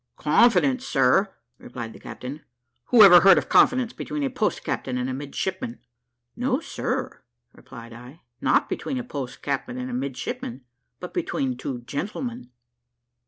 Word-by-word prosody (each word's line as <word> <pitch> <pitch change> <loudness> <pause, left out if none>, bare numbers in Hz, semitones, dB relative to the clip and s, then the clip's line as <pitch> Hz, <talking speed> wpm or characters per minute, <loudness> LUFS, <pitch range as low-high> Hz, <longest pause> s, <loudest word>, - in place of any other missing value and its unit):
"Confidence, 160 - +3
sir!" 190 +11 +2 0.3
replied 120 -2 -8
the - - -13
captain; 140 +5 -8 0.4
"who 235 -4 +7
ever 180 -3 +10
heard 195 +2 +7
of - - -1
confidence 255 -2 +4
between 300 -1 -4
a 270 - -1
post 245 -5 -1
captain 125 -1 -3
and 125 0 -2
a 130 - -3
midshipman?" 140 0 -4 0.6
"No, 255 +3 0
sir," 320 - -4 0.3
replied 115 0 -12
I, 125 +8 -13 0.2
"not - - +2
between 270 - -4
a 250 - -3
post 140 - -7
captain 135 -3 -3
and 125 0 -5
a - - -5
midshipman 130 -1 -5 0.4
but - - -8
between 130 -2 -2
two 125 0 -5
gentlemen." 185 - -5
140 Hz, 150 wpm, -24 LUFS, -, 0.6 s, ever